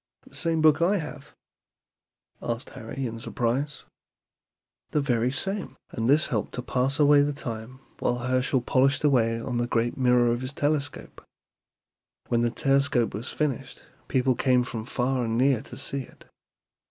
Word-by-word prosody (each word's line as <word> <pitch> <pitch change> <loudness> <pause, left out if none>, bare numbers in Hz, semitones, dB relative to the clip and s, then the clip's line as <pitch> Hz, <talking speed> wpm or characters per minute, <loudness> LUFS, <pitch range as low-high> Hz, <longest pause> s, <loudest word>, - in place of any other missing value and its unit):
'" - - -66
"The - - -18
same 165 -2 0
book 155 0 +5
I 190 +5 +3
have?" 150 -3 -8 1.1
asked 120 +1 -4
Harry, 130 +4 -6
in 115 -1 -5
surprise. 130 +5 -2 1.1
"The 150 - +1
very 125 -4 +1
same; 195 +9 -3
and 115 +1 -1
this 150 +3 +5
helped 110 - -2
to 125 - -4
pass 130 +3 +1
away 145 -1 +6
the 145 +1 +1
time 125 -1 -7 0.2
while 120 - 0
Herschel 130 +1 +1
polished 135 +4 +2
away 115 -6 +3
on 120 +1 -3
the 120 0 0
great 120 0 0
mirror 125 -2 +4
of 120 +1 -1
his 130 +2 -5
telescope. 145 -1 -2 1.1
When 120 -1 +2
the 120 - +2
telescope 135 -1 +1
was 110 +6 -4
finished 150 -5 -3 0.2
people 130 0 +2
came 125 0 +2
from 115 -3 -5
far 125 0 0
and 115 0 -1
near 130 -2 +3
to - - -9
see 140 - -1
it. 130 - -14
130 Hz, 165 wpm, -26 LUFS, 120-145 Hz, 1.1 s, away